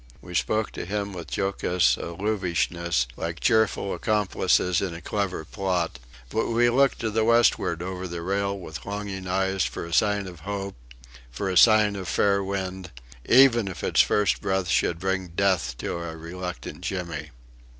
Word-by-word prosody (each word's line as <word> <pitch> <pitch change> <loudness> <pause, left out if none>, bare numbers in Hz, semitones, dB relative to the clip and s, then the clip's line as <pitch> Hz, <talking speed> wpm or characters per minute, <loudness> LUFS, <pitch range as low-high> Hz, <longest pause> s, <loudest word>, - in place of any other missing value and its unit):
We 90 +4 -11
spoke 110 +5 0
to - - -6
him 100 0 -3
with 85 -3 -6
jocose 90 -3 +2
allusiveness, 85 - -1
like 85 0 -4
cheerful 110 -4 +2
accomplices 95 -3 +1
in 90 -4 -3
a - - -7
clever 100 -6 -2
plot; 90 - -2 0.3
but 110 - 0
we 120 +1 +3
looked 135 +2 +3
to 110 -1 -1
the 110 +1 +1
westward 115 -7 +3
over 95 0 -4
the 85 -1 -6
rail 100 +2 -1
with 80 -7 -8
longing 100 -2 -5
eyes 95 0 +1
for - - -4
a 85 - -7
sign 105 0 +2
of 90 -3 -9
hope, 100 +2 -5 0.5
for 80 +11 -3
a - - -3
sign 105 +1 +6
of 95 -2 -5
fair 100 +2 +2
wind; 95 -1 -4 0.4
even 120 -4 +6
if 90 -6 -6
its - - +4
first 105 -4 +2
breath 95 -2 -1
should 85 - +2
bring 95 +1 -1
death 85 -8 0
to - - -3
our 85 -1 -5
reluctant 90 -3 -7
Jimmy. 85 -5 -4
95 Hz, 165 wpm, -25 LUFS, 85-100 Hz, 0.5 s, sign